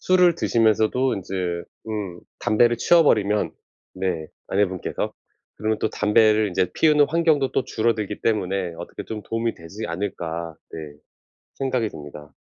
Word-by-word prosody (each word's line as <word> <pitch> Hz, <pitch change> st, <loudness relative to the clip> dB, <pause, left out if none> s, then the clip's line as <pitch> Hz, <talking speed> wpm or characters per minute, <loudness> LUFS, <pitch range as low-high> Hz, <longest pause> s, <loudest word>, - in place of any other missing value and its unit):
술을 180 Hz, -2 st, +4 dB
드시면서도 115 Hz, 0 st, +2 dB
인제 95 Hz, 0 st, -6 dB, 0.5 s
음 100 Hz, -5 st, -4 dB, 0.2 s
담배를 120 Hz, +3 st, +3 dB
치워버리면 105 Hz, -12 st, +3 dB, 0.4 s
네 90 Hz, -4 st, -2 dB, 0.2 s
아내분께서 95 Hz, -2 st, -1 dB, 0.5 s
그러면 110 Hz, +1 st, 0 dB
또 -, -, 0 dB
담배를 110 Hz, 0 st, +4 dB
인제 90 Hz, 0 st, 0 dB
피우는 150 Hz, -2 st, +5 dB
환경도 155 Hz, -5 st, +2 dB
또 -, -, +2 dB
줄어들기 110 Hz, -3 st, -1 dB
때문에 95 Hz, -5 st, 0 dB
'어떻게 85 Hz, -, -7 dB
좀 105 Hz, -2 st, -6 dB
도움이 115 Hz, 0 st, -2 dB
되지 85 Hz, +7 st, -7 dB
않을까.' 85 Hz, -3 st, -4 dB, 0.2 s
네 75 Hz, -2 st, -7 dB, 0.6 s
생각이 130 Hz, -4 st, 0 dB
듭니다. 75 Hz, -3 st, -11 dB
105 Hz, 315 characters per minute, -23 LUFS, 90-115 Hz, 0.6 s, 피우는